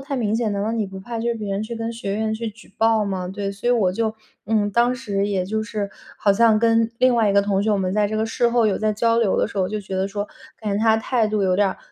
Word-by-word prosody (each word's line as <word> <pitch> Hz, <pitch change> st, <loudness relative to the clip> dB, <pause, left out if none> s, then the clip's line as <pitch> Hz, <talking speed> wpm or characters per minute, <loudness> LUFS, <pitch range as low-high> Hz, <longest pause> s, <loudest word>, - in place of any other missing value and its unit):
太 280 Hz, -, -2 dB
明 220 Hz, -4 st, 0 dB
显， 225 Hz, -1 st, 0 dB
难 200 Hz, 0 st, -2 dB
道 220 Hz, +2 st, -1 dB
你 225 Hz, -3 st, -1 dB
不 190 Hz, 0 st, -9 dB
怕 230 Hz, +4 st, -6 dB
就 235 Hz, +1 st, -1 dB
是 235 Hz, -, 0 dB
别 210 Hz, -3 st, -5 dB
人 195 Hz, +2 st, -1 dB
去 225 Hz, +2 st, -5 dB
跟 225 Hz, 0 st, -3 dB
学 200 Hz, -4 st, -4 dB
院 220 Hz, +1 st, -1 dB
去 225 Hz, +1 st, -3 dB
举 215 Hz, -2 st, -14 dB
报 225 Hz, -1 st, +3 dB
吗？ 185 Hz, -2 st, -3 dB
对， 200 Hz, +1 st, -4 dB
所 200 Hz, +5 st, -3 dB
以 -, -, +4 dB
我 205 Hz, -7 st, +2 dB
就 220 Hz, +2 st, -1 dB, 0.3 s
嗯， 210 Hz, -1 st, +1 dB
当 240 Hz, +4 st, +2 dB
时 205 Hz, -5 st, -2 dB
也 190 Hz, -3 st, 0 dB
就 220 Hz, +3 st, -2 dB
是， 210 Hz, -2 st, -4 dB, 0.3 s
好 200 Hz, -, +3 dB
像 220 Hz, +1 st, +4 dB
跟 230 Hz, 0 st, +3 dB
另 255 Hz, 0 st, +4 dB
外 225 Hz, -3 st, +3 dB
一 200 Hz, -, +1 dB
个 200 Hz, -, +5 dB
同 200 Hz, -1 st, 0 dB
学， 215 Hz, -, +1 dB
我 210 Hz, -, +3 dB
们 185 Hz, -1 st, -1 dB
在 210 Hz, 0 st, +2 dB
这 215 Hz, -, -2 dB
个 220 Hz, -, +1 dB
事 235 Hz, +2 st, +1 dB
后， 235 Hz, -1 st, +3 dB
有 205 Hz, -, +1 dB
在 215 Hz, 0 st, +1 dB
交 230 Hz, +2 st, +2 dB
流 225 Hz, -5 st, +2 dB
的 -, -, +2 dB
时 200 Hz, -, -6 dB
候， 185 Hz, -1 st, +1 dB
就 215 Hz, +1 st, -3 dB
觉 195 Hz, -1 st, -7 dB
得 190 Hz, +1 st, 0 dB
说 205 Hz, +1 st, -3 dB, 0.3 s
感 210 Hz, -2 st, -3 dB
觉 -, -, -1 dB
他 220 Hz, -1 st, +4 dB
态 225 Hz, 0 st, +1 dB
度 210 Hz, -1 st, 0 dB
有 185 Hz, -1 st, +2 dB
点 200 Hz, +1 st, +3 dB
儿 185 Hz, -, -5 dB
215 Hz, 330 characters per minute, -22 LUFS, 200-230 Hz, 0.3 s, 个